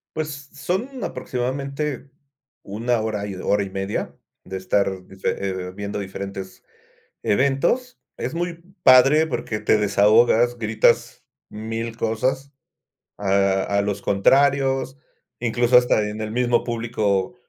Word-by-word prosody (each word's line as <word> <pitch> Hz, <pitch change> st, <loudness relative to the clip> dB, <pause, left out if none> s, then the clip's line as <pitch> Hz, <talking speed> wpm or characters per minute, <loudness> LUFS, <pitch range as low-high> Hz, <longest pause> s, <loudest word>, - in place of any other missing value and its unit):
Pues, 150 Hz, -3 st, -5 dB
son 230 Hz, -, -3 dB
aproximadamente, 140 Hz, +2 st, -3 dB, 0.5 s
1 115 Hz, +4 st, -1 dB
hora, 110 Hz, -2 st, -2 dB, 0.2 s
1:30 100 Hz, 0 st, -1 dB, 0.3 s
de 95 Hz, +1 st, -6 dB
estar 95 Hz, 0 st, -1 dB
dife 95 Hz, 0 st, -3 dB, 0.4 s
eh, -, -, -8 dB
viendo 100 Hz, +1 st, -5 dB
diferentes 95 Hz, -1 st, -7 dB, 0.6 s
eventos. 140 Hz, -, +1 dB, 0.2 s
Es -, -, -4 dB
muy 175 Hz, 0 st, -2 dB, 0.3 s
padre, 135 Hz, +5 st, +7 dB
porque 110 Hz, -8 st, -3 dB
te 105 Hz, 0 st, +3 dB
desahogas. 110 Hz, +4 st, +4 dB
Gritas 110 Hz, -1 st, +1 dB, 0.3 s
1000 115 Hz, +1 st, -5 dB
cosas 130 Hz, +5 st, -1 dB, 0.7 s
a 95 Hz, -1 st, +2 dB
a 100 Hz, 0 st, 0 dB
los 100 Hz, 0 st, -2 dB
contrarios, 135 Hz, +5 st, +2 dB, 0.4 s
incluso, 120 Hz, +1 st, +1 dB
hasta 115 Hz, -4 st, +3 dB
en 105 Hz, +1 st, -5 dB
el 110 Hz, -, -3 dB
mismo 120 Hz, 0 st, +1 dB
público. 115 Hz, -3 st, -1 dB
115 Hz, 110 wpm, -22 LUFS, 100-135 Hz, 0.7 s, padre